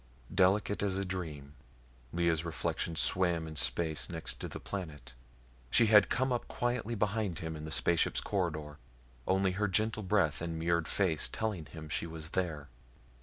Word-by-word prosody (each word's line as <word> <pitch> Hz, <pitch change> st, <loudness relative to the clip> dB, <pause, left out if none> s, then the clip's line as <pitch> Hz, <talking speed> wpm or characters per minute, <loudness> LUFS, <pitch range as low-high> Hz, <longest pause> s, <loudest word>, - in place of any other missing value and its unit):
Delicate 100 Hz, +2 st, +3 dB
as 100 Hz, -2 st, 0 dB
a 100 Hz, -, -1 dB
dream, 80 Hz, -7 st, -5 dB, 0.6 s
Lea's 85 Hz, -2 st, +1 dB
reflection 85 Hz, 0 st, -2 dB
swam 85 Hz, -1 st, +2 dB
in 80 Hz, -, -7 dB
space 75 Hz, -4 st, +1 dB
next -, -, -4 dB
to -, -, -4 dB
the -, -, -7 dB
planet. 75 Hz, -10 st, -6 dB, 0.6 s
She 115 Hz, -, +5 dB
had 105 Hz, -2 st, +6 dB
come 130 Hz, +1 st, +1 dB
up 120 Hz, -, -2 dB
quietly 120 Hz, -2 st, -1 dB
behind 105 Hz, -3 st, 0 dB
him 80 Hz, -1 st, -4 dB
in 75 Hz, 0 st, -7 dB
the 80 Hz, -, -6 dB
spaceship's 85 Hz, +1 st, +2 dB
corridor, 75 Hz, -7 st, -2 dB, 0.5 s
only 95 Hz, 0 st, +3 dB
her 105 Hz, +3 st, 0 dB
gentle 110 Hz, +3 st, +1 dB
breath 95 Hz, -7 st, +2 dB
and 85 Hz, -1 st, -3 dB
mirrored 85 Hz, -1 st, +1 dB
face 85 Hz, -6 st, +2 dB
telling 105 Hz, -9 st, -3 dB
him 80 Hz, +1 st, -9 dB
she 80 Hz, -, -2 dB
was 80 Hz, -1 st, -7 dB
there. 80 Hz, -6 st, -2 dB
85 Hz, 165 wpm, -32 LUFS, 80-100 Hz, 0.6 s, had